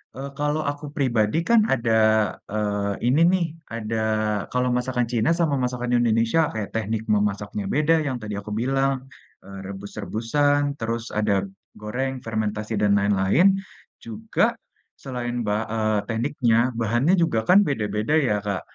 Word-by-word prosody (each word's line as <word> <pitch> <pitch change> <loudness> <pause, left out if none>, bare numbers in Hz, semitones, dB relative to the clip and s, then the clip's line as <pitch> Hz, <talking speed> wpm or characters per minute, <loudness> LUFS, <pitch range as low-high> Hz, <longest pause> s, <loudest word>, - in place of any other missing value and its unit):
eee, 135 +1 -6
kalau 150 +1 0
aku 145 +1 -9
pribadi 120 -3 +1
kan 235 -1 +6
ada, 115 -3 0 0.6
eee, 105 -1 -1
ini 140 +6 +3
nih 185 -2 +2 0.3
ada 115 0 -3 0.5
kalau 125 0 +1
masakan 125 -1 -1
Cina 120 +3 +1
sama 155 -4 +2
masakan 125 -1 -1
Indonesia 115 +5 +2
kayak 110 -2 -4
teknik 110 0 -2
memasaknya 105 0 -1
beda 155 +3 +3
yang 130 -2 -2
tadi 105 -1 -5
aku 100 +1 -6
bilang, 135 +2 +1 0.5
eee, 100 0 -10
rebus-rebusan. 120 +9 -1
Terus, 115 +1 -4
ada 100 -2 +1 0.3
goreng, 130 +5 -3
fermentasi 110 -1 -3
dan 105 0 +2
lain-lain. 100 - +3 0.5
Juga 225 0 0 0.5
selain 120 -2 -4
ba 105 +1 -1
eee, 110 -1 0
tekniknya 120 0 +1
bahannya 120 - +2
juga 160 -10 +2
kan 200 +2 +7
beda-beda 105 0 -1 0.2
ya, 105 - +2
Kak. 100 -2 -2
115 Hz, 140 wpm, -23 LUFS, 105-135 Hz, 0.6 s, kan